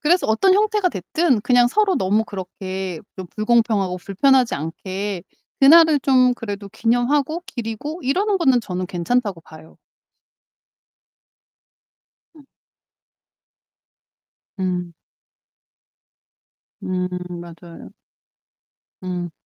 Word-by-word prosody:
그래서 345 +4 +2
어떤 225 - +3
형태가 420 -1 +2
됐든 270 - 0
그냥 245 0 +4
서로 410 +5 +2
너무 205 +4 +1
그렇게 190 -3 -6 0.2
좀 185 -2 -7
불공평하고 215 -4 +1
불편하지 250 +7 +2
않게 185 +5 -5 0.4
그날을 315 +1 +7
좀 255 -2 +3
그래도 205 -4 -6
기념하고 265 - 0
기리고 240 +8 -6
이러는 390 +10 +1
거는 265 -8 +3
저는 185 -4 -4
괜찮다고 190 +2 -1
봐요. 160 0 -16 2.6
음. 300 - -15 2.2
음. 180 -2 -2 1.9
음 180 0 -2 0.3
맞아요. 170 0 -12 1.1
음. 180 -1 -4
220 Hz, 200 characters per minute, -21 LUFS, 185-275 Hz, 2.6 s, 그날을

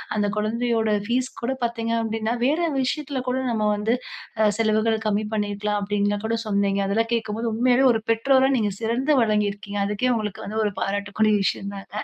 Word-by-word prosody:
அந்த 210 -1 +1
குழந்தையோட 225 +1 0 0.2
ஃபீஸ் 250 +3 0
கூட 245 +3 -1
பார்த்தீங்க 230 -1 -1
அப்படின்னா 225 0 -1
வேறு 310 +6 +2 0.2
விஷயத்தில 275 0 -2
கூட 255 - 0
நம்ம 215 -2 +1
வந்து, 215 +3 +1 0.5
அ 215 - +5
செலவுகள் 220 0 +2
கம்மி 210 0 0
பண்ணிருக்கலாம். 205 0 -1
அப்படின்லா 205 0 0
கூட 225 +1 0
சொன்னீங்க. 200 -1 +1
அதெல்லாம் 225 +3 0
கேட்கும்போது 225 0 -1
"உண்மையாவே 250 +3 +3
ஒரு 225 - -1
பெற்றோரா 265 +4 +3
நீங்க 210 -3 0
சிறந்து 240 +6 0
விளங்கியிருக்கீங்க." 205 -2 -1
அதுக்கே 210 +5 0
உங்களுக்கு 210 -3 -4
வந்து 215 +2 -2
ஒரு 205 - -1
பாராட்டக்கூடிய 205 +2 0
விஷயம் 200 +1 -2
தாங்க. 200 +2 -6
220 Hz, 165 wpm, -23 LUFS, 205-235 Hz, 0.5 s, அ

